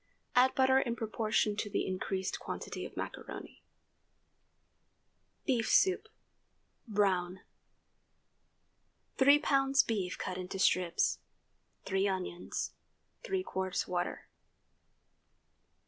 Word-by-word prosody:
Add 255 +1 +5
butter 265 0 +5
in 235 -3 -1
proportion 220 -2 0
to 210 - -2
the - - -1
increased 190 0 -2
quantity - - -5
of - - -18
macaroni. - - -7 1.8
BEEF 240 -5 +1
SOUP 380 +3 +4 0.8
(brown). 190 -4 +1 1.8
3 280 +2 +7
lbs. 275 -2 +3
beef 195 -5 -2
cut 185 0 -4
into 185 +1 -5
strips. 180 -2 +2 0.7
3 195 +1 +1
onions. 185 -2 -3 0.5
3 385 -6 -1
qts. 190 - -2
water. 175 -1 -3
210 Hz, 90 wpm, -32 LUFS, 185-265 Hz, 1.8 s, 3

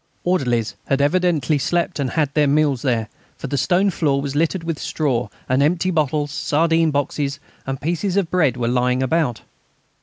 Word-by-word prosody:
Orderlies 125 -11 0
had 135 - +1
evidently 155 -2 +2
slept 170 +3 -1
and 135 -2 0
had 150 -2 0
their 150 -1 +3
meals 145 -3 +2
there, 115 -5 0 0.3
for - - -7
the 135 - -2
stone 180 +9 +2
floor 145 -5 +1
was 140 0 -4
littered 165 +3 0
with 165 -3 -3
straw, 130 -6 -1 0.2
and 130 +2 +2
empty 175 +5 +2
bottles, 150 -2 0
sardine 165 +2 +2
boxes, 145 0 -2 0.3
and 135 -1 -3
pieces 175 +5 -1
of 190 -5 0
bread 150 -9 +2
were 120 -1 -1
lying 125 +1 +1
about. 130 -5 0
145 Hz, 175 wpm, -21 LUFS, 135-165 Hz, 0.3 s, their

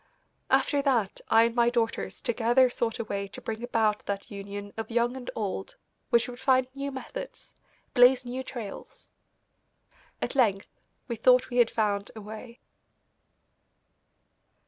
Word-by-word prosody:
After 285 -2 +3
that 245 -8 0
I 225 0 +6
and 230 0 +1
my 235 0 +4
daughters 230 -2 -2
together 240 +2 +3
sought 230 -2 -1
a - - -2
way 200 -2 -3
to 195 - -10
bring 220 0 -5
about 220 -3 +1
that 200 -1 -4
union 200 0 -7
of 220 -1 -5
young 240 +1 +1
and 255 -2 -7
old 195 -3 -4 0.3
which 235 0 +3
would 245 0 -8
find 260 -1 +3
new 275 0 -4
methods, - - -8 0.4
blaze 250 0 +6
new 250 +2 -4
trails. 240 -6 -8 1.1
At - - -3
length 210 -8 +1 0.3
we 235 - -3
thought 250 +2 +4
we 245 - -2
had 240 -2 +5
found 205 -2 0
a 220 - -8
way. 220 +3 -10
235 Hz, 145 wpm, -28 LUFS, 215-250 Hz, 1.1 s, I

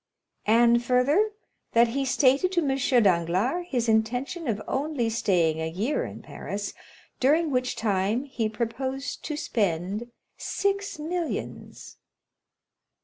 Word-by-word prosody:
"And, 235 +2 +5
further, 275 - +3 0.4
that 235 0 +5
he 275 +3 -1
stated 275 +6 +3
to 345 - +3
M. 265 -3 +3
Danglars 190 - +1
his 245 -3 0
intention 245 +9 0
of 220 -3 0
only 265 -4 -1
staying 170 -8 +1
a 160 - -2
year 210 - -1
in - - -9
Paris, 200 0 -5 0.5
during 305 +4 +3
which 250 -1 0
time 210 +3 0
he 240 -6 -2
proposed 260 +5 -4
to 300 - -3
spend 205 - -1 0.3
six 400 -2 -1
millions. 330 +2 -5
245 Hz, 120 wpm, -26 LUFS, 215-285 Hz, 0.5 s, And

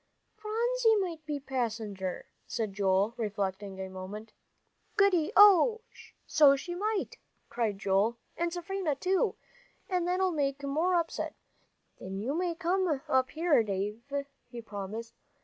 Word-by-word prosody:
"Phronsie 460 +1 +1
might 350 -6 -2
be 295 -1 -2
passenger," 220 -8 -3 0.2
said 220 -4 -3
David, 195 +1 +2
reflecting 200 -2 -3
a 190 - -4
moment. 190 +4 -8 0.6
"Goody, 390 -5 +3
oh, 415 +3 +7 0.4
so 290 -3 +6
she 350 +6 -5
might!" 415 +3 -2 0.3
cried 220 -4 -1
Joel, 200 +4 +1 0.2
"and 340 +1 -1
Seraphina 350 -2 -2
too. 370 +6 +1 0.5
And 360 -2 0
that'll 370 +1 +1
make 280 -3 -1
more 315 +6 +1
upset. 335 -1 -1 0.6
Then 190 +1 -6
you 230 +8 -2
may 345 +1 -1
come 350 -3 +1
up 260 -1 +2
here, 320 -5 +3
Dave," 205 +1 -3 0.5
he 240 - -7
promised. 220 +1 -6
280 Hz, 130 wpm, -30 LUFS, -, 0.6 s, oh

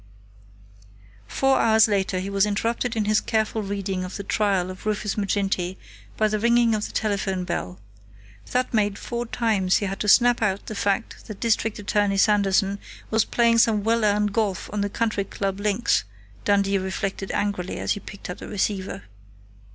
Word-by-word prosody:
Four 270 - +2
hours 220 0 +5
later 195 -3 0
he 190 +2 -4
was 200 +1 +2
interrupted 230 +4 -1
in 215 -2 0
his 210 0 +3
careful 220 0 0
reading 195 -2 -3
of 180 - -6
the 200 - -5
trial 195 -3 0
of 185 +3 -9
Rufus 210 -1 -1
Maginty 195 -3 -1 0.4
by 215 - +3
the 215 0 -1
ringing 235 0 +3
of 215 -1 -1
the - - -11
telephone 195 -3 -1
bell. 90 - -4 0.7
That 250 0 0
made 205 -2 +1
four 240 0 -4
times 215 -6 +1
he 205 - -2
had - - -2
had 195 - -5
to 210 - -2
snap 240 +3 +5
out 200 -2 0
the - - -6
fact 205 +2 -2
that 215 -3 -8
District 225 -2 0
Attorney 205 -1 0
Sanderson 200 -1 +2 0.3
was 220 -1 +3
playing 235 -1 +3
some 215 -3 +3
well 230 +1 +1
earned 210 -1 +2
golf 205 -5 -1
on 210 - -1
the 200 - -1
Country 215 -1 -1
Club 195 0 -3
links, 210 +3 +1 0.4
Dundee 200 -1 +2
reflected 190 +1 -3
angrily, 200 -3 -2
as - - -2
he - - 0
picked 200 - -10
up 180 - -6
the - - -8
receiver. 195 - -2
205 Hz, 180 wpm, -24 LUFS, 195-220 Hz, 0.7 s, hours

